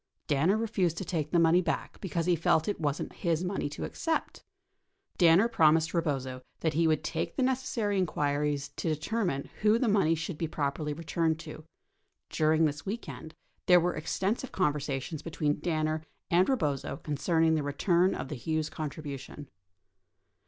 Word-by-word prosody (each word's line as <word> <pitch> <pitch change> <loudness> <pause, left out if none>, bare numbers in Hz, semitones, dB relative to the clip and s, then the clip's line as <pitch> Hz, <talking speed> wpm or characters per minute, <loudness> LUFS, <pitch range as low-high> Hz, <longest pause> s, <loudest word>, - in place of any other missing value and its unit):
Danner 160 +8 +2
refused 195 -7 0
to 190 - -4
take 155 -4 -2
the 175 - +2
money 170 +1 +5
back 170 -3 -3
because 170 -4 -2
he 175 -1 +3
felt 160 0 +2
it 205 - -2
wasn't 145 -1 -2
his 170 -1 -1
money 180 -5 -2
to 145 - -6
accept. 325 -1 -2 0.8
Danner 175 +5 +6
promised 160 -6 +3
Eebozo 135 -6 -2 0.2
that 160 -1 +1
he 165 +1 +3
would 155 -2 +1
make 165 - -2
the 265 - +1
necessary 245 -6 0
inquiries 145 -3 0
to - - -1
determine 160 -1 -2
who 215 +1 +5
the 245 - +1
money 195 -6 +3
should 165 0 -5
be 165 - -1
properly 150 0 -2
returned 160 +1 -1
to. 155 -1 -10 0.7
During 160 0 +3
this 145 -1 -2
weekend, 195 -6 -6 0.3
there 180 -1 +8
were 175 +1 0
extensive 195 +10 -2
conversations 150 -2 -1
between 150 -2 -1
Danner 155 -2 -1 0.3
and 180 +2 +4
Eebozo 145 - -1
concerning 160 +2 +2
the 155 - +1
return 170 +6 +2
of - - -5
the 150 - -4
Hughes 155 +4 -2
contribution. 145 -2 -6
160 Hz, 160 wpm, -29 LUFS, 150-180 Hz, 0.8 s, there